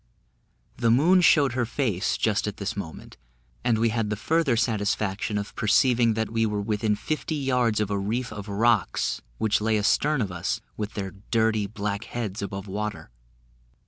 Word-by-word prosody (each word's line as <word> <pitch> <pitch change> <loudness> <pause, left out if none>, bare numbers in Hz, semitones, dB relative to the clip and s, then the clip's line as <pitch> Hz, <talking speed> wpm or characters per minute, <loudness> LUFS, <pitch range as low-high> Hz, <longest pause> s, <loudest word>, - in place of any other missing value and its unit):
The 115 -2 +2
moon 165 +10 +5
showed 145 -7 +5
her 125 0 0
face, 115 -5 -1
just 105 -1 +1
at 105 - -4
this 100 -1 -3
moment, 90 -6 -8 0.5
and 120 -2 +2
we 115 +1 +2
had 110 -1 -1
the 105 - -1
further 140 +3 +1
satisfaction 105 -2 0
of 100 0 -5
perceiving, 115 +1 +3
that 110 0 -2
we 115 0 +1
were 105 -2 0
within 105 0 0
fifty 155 +6 -3
yards 125 -6 +1
of 105 -1 -1
a 100 - 0
reef 110 +4 -2
of 105 -1 -7
rocks 110 -1 +1 0.2
which 110 -1 +1
lay 110 0 +2
astern 140 +8 +2
of 105 -6 -1
us, 90 -1 -2 0.2
with 105 0 -5
their 95 -3 -3 0.2
dirty, 110 -3 +2
black 105 0 -3
heads 110 -5 -4
above 100 0 -5
water. 105 - -4
110 Hz, 175 wpm, -26 LUFS, 105-120 Hz, 0.5 s, moon